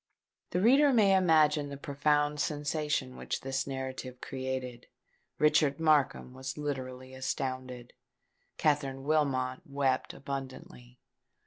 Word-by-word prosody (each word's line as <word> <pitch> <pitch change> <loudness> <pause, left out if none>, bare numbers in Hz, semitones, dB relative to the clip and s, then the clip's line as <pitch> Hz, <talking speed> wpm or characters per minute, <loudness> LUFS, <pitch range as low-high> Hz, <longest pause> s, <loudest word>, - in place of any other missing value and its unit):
The 180 - 0
reader 275 +6 +6
may 205 -6 +5
imagine 155 -5 +4
the 140 - -7
profound 145 +1 +1
sensation 145 -3 -1
which - - -4
this 135 0 -2
narrative 130 -1 -5
created. 130 -2 -5 0.5
Richard 150 -1 +3
Markham 145 -5 +2
was 130 +1 -6
literally 130 -3 -5
astounded. 130 -2 -4 0.6
Katherine 140 -3 0
Wilmot 135 -4 +1
wept 140 -2 -1
abundantly. 130 -2 -7
140 Hz, 105 wpm, -30 LUFS, 130-150 Hz, 0.6 s, reader